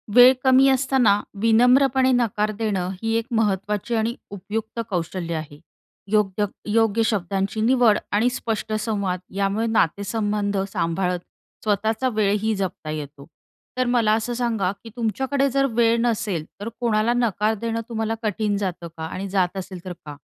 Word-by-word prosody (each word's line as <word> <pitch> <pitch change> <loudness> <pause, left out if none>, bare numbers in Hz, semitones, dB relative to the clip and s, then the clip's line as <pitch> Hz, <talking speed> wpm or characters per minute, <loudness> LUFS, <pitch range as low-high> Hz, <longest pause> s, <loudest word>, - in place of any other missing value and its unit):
वेळ 250 +1 +9
कमी 265 +1 +6
असताना 260 -6 +3 0.2
विनम्रपणे 255 +3 +4
नकार 215 -3 +1
देणं 195 -5 -1
ही 225 0 -1
एक 230 - -2
महत्वाची 210 +2 -1
आणि 225 +2 0 0.2
उपयुक्त 215 +4 -5
कौशल्य 170 -1 -3
आहे. 150 -2 -7 0.5
योग्य 210 -1 +2 0.3
योग्य 225 0 +3
शब्दांची 195 0 -1
निवड 235 -2 +4
आणि 215 +4 +3
स्पष्ट 225 -3 -3
संवाद 200 -5 -1 0.2
यामुळे 200 +3 0
नातेसंबंध 205 0 0 0.2
सांभाळत 180 +2 0 0.4
स्वतःचा 220 +4 0
वेळही 215 -1 +1
जपता 190 -4 -4
येतो. 145 -2 -6 0.5
तर 255 - +2
मला 235 -3 +3
असं 225 +2 -1
सांगा 230 -6 0
की 230 - -9
तुमच्याकडे 265 +5 0
जर 275 +1 +2
वेळ 230 0 +3
नसेल 210 -8 -1 0.2
तर 215 - -3
कोणाला 230 -1 +2
नकार 220 -3 +1
देणं 230 0 -2
तुम्हाला 225 -1 -2
कठीण 210 -1 0
जातं 180 -4 -3
का? 160 - -6
आणि 185 +4 -5
जात 190 -1 0
असेल 185 -2 -7
तर 180 - -5
का? 145 -1 -8
215 Hz, 145 wpm, -23 LUFS, 195-230 Hz, 0.5 s, वेळ